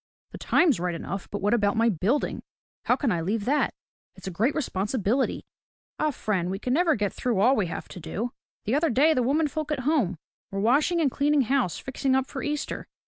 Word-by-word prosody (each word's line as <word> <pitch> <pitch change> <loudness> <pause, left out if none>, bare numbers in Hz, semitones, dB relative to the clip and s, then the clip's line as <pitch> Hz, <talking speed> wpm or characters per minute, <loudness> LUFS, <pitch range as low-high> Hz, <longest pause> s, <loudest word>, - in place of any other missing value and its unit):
"The - - -9
time's 300 - +3
right 175 -1 -1
enough, 195 +3 -5
but 205 - -5
what 205 +2 +2
about 205 -2 +2
my 230 +1 +4
building? 220 - 0 0.4
How - - +4
can 265 -7 0
I 170 - 0
leave 205 +5 -1
that. 290 +3 +1 0.4
It's - - -13
a 190 - -3
great 220 - 0
responsibility." 230 -1 -1 0.5
"Eh, 305 - +2
friend, 200 - -1
we 190 - -2
can 250 +5 -2
never 330 +1 +3
get 205 -3 -1
through 240 -6 -1
all 250 +7 +5
we 205 -7 0
have - - -6
to - - -9
do. 195 +9 -4 0.3
The 215 - 0
other 310 +3 +2
day 290 +7 +4
the 255 - +1
women 295 +6 +2
folk 310 +1 -4
at 285 -3 -1
home 255 - +1 0.3
were 195 - -4
washing 285 - +3
and 285 -4 +2
cleaning 290 +2 +2
house, 255 -7 +1
fixing 265 0 -1
up 265 0 +2
for 265 - -6
Easter. 295 +1 -3
245 Hz, 215 wpm, -26 LUFS, 200-290 Hz, 0.5 s, all